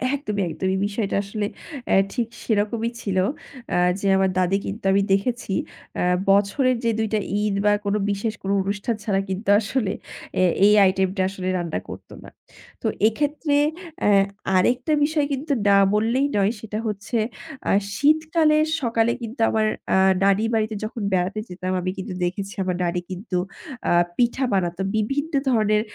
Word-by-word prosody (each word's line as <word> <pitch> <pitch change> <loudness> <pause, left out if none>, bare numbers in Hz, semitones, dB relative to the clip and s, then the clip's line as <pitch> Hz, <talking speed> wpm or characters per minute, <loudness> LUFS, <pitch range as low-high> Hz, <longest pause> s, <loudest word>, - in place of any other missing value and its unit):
একদমই, 210 -8 -3
একদমই। 190 +4 -1
বিষয়টা 205 0 -2
আসলে 205 +1 -3 0.4
অ্যা - - +3 0.2
ঠিক 240 -3 -1 0.2
সেরকমই 220 +1 0
ছিল। 195 -2 -2 0.5
অ্যা - - +1 0.2
যে 200 - -1
আমার 190 0 +3
দাদি 185 +2 +2
কিন্তু 210 +4 -6
আমি 195 +1 +3
দেখেছি 205 +1 -1 0.4
অ্যা - - 0 0.3
বছরের 235 +6 +2
যে 230 - +2
২ 220 - +1
টা 215 - +3 0.2
ঈদ 210 -1 0
বা 210 - +5
কোনো 200 +1 +1
বিশেষ 205 +2 -2
কোনো 195 +1 -1
অনুষ্ঠান 205 +4 -2
ছাড়া 200 -3 +1
কিন্তু 190 +2 -3
আসলে 220 -1 -1 0.5
এ - - +4 0.2
এই 210 - +6 0.2
item 190 0 +1
টা - - +2
আসলে 190 -1 -6
রান্না 170 -3 -2
করতো - - -10
না। - - -11 0.5
তো - - -1 0.2
এক্ষেত্রে 290 +5 0 0.4
অ্যা - - +3 0.5
আরেকটা 250 +10 +2
বিষয় 300 0 +1
কিন্তু 280 +2 -2 0.2
না 200 - +6 0.2
বললেই 230 +6 +2
নয়। 200 +1 +3
সেটা 215 0 -5
হচ্ছে 210 +3 -3 0.5
আ - - +3 0.2
শীতকালের 310 +2 +3 0.2
সকালে 230 -2 +2
কিন্তু 230 +3 -7
আমার 220 -1 +1 0.3
আ - - +4 0.3
নানি 200 +2 +3
বাড়িতে 220 -1 0
যখন 220 +1 -5
বেড়াতে 185 +3 0
যেতাম 185 +1 -4
আমি 185 +1 -2
কিন্তু 190 0 -5
দেখেছি 195 +3 -3
আমার 185 -1 -1
নানি 175 0 0
কিন্তু 185 0 -3 0.5
আ - - +2 0.3
পিঠা 245 +2 +1
বানাতো। 175 -1 0
বিভিন্ন 275 +9 -1 0.2
ধরনের 215 -3 +3
210 Hz, 160 wpm, -23 LUFS, 195-235 Hz, 0.5 s, এই